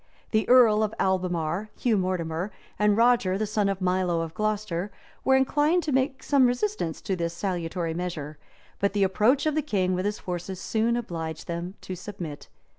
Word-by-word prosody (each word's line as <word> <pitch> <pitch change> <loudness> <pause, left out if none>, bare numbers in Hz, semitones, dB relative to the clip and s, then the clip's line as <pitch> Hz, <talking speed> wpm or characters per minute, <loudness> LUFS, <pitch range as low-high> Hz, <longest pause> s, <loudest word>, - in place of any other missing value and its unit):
The 215 -1 +1
earl 235 -4 +7
of 215 0 -1
Albemarle, 180 0 0
Hugh 235 -3 +2
Mortimer, 180 -1 -1 0.3
and 210 0 +3
Roger 230 -6 +4
the 215 - 0
son 210 -1 0
of 195 -1 -2
Milo 180 -2 +1
of 165 -1 -5
Glocester, 210 -2 -1 0.3
were 265 - +4
inclined 295 +6 +3
to 305 - -2
make 265 +1 0
some 275 -3 +4
resistance 245 - -1
to 190 - -1
this 170 -1 -3
salutary 175 -2 -2
measure; 160 -4 -5 0.4
but 200 0 +1
the 205 -1 +2
approach 215 +9 +3
of 310 - +2
the 310 - +1
king 190 -10 0
with 185 +1 -1
his 205 +1 -1
forces 180 +1 -5
soon 230 +4 0
obliged 165 -8 -5
them 175 +2 -4
to 185 - -6
submit. 175 -6 -7
195 Hz, 180 wpm, -26 LUFS, 175-225 Hz, 0.4 s, earl